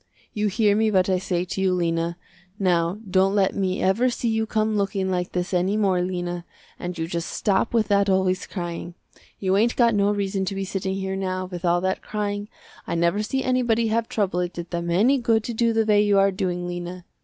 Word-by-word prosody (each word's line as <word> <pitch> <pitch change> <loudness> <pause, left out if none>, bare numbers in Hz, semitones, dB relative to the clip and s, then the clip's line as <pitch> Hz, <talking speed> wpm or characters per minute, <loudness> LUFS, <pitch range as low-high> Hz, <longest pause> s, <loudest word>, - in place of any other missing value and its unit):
You 210 0 0
hear 205 0 +2
me 220 +1 +2
what 190 -2 +2
I 185 - +2
say 180 -1 -1
to 190 - -4
you 185 -1 +2
Lena. 170 -1 -1 0.4
Now 175 -2 +1
don't 190 +1 +2
let 195 -2 +2
me 190 -1 -1
ever 225 +7 +3
see 240 -1 -2
you 220 0 0
come 215 0 0
looking 195 -2 0
like 180 -1 -2
this 180 +1 -2
any 185 +3 +1
more 190 -4 +2
Lena, 175 -1 -3 0.4
and 175 0 -5
you 165 - -2
just 170 0 -3
stop 200 +2 0
with 225 -3 +2
that 200 0 +3
always 190 0 +1
crying. 175 -2 -5 0.4
You 190 -1 0
ain't 230 +4 +2
got 235 -2 +4
no 200 -1 +2
reason 200 -1 -1
to 195 - -3
be 195 0 -2
sitting 190 0 -3
there 190 0 -2
now 185 -1 -2
with 180 -1 -7
all 175 0 +3
that 190 +1 -1
crying, 205 0 -3 0.4
I - - -2
never 170 +5 +1
see 265 +5 -2
anybody 235 -3 +1
have 230 +1 0
trouble 195 -4 0
it 180 0 -2
did 170 0 -7
them 170 0 -2
any 230 +11 +3
good 225 -2 +2
to 235 - -4
do 230 +1 +2
the 225 -1 +2
way 210 -1 +4
you 205 -1 +3
are 195 0 +4
doing, 180 -2 -2
Lena. 175 0 -6
190 Hz, 225 wpm, -24 LUFS, 180-210 Hz, 0.4 s, got